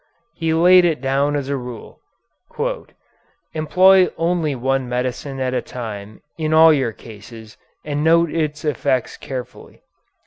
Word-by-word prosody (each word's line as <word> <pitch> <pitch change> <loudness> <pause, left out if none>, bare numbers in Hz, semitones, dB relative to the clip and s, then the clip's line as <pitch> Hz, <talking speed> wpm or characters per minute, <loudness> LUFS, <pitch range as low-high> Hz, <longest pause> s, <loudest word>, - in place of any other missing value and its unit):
He 165 -1 -2
laid 180 +3 +6
it 165 -3 +1
down 140 +2 0
as 140 -2 -3
a 140 - -1
rule: 125 -3 -9 1.5
"Employ 185 +4 +4
only 165 -3 0
one 130 0 -1
medicine 125 +2 -3
at 130 -1 -1
a - - 0
time 110 -4 -8 0.2
in 155 0 0
all 160 0 +7
your 130 -5 0
cases 110 0 -13 0.3
and 145 0 -2
note 165 0 +3
its 155 -2 -2
effects 140 -4 -1
carefully." 130 -2 -9
140 Hz, 135 wpm, -20 LUFS, 125-160 Hz, 1.5 s, all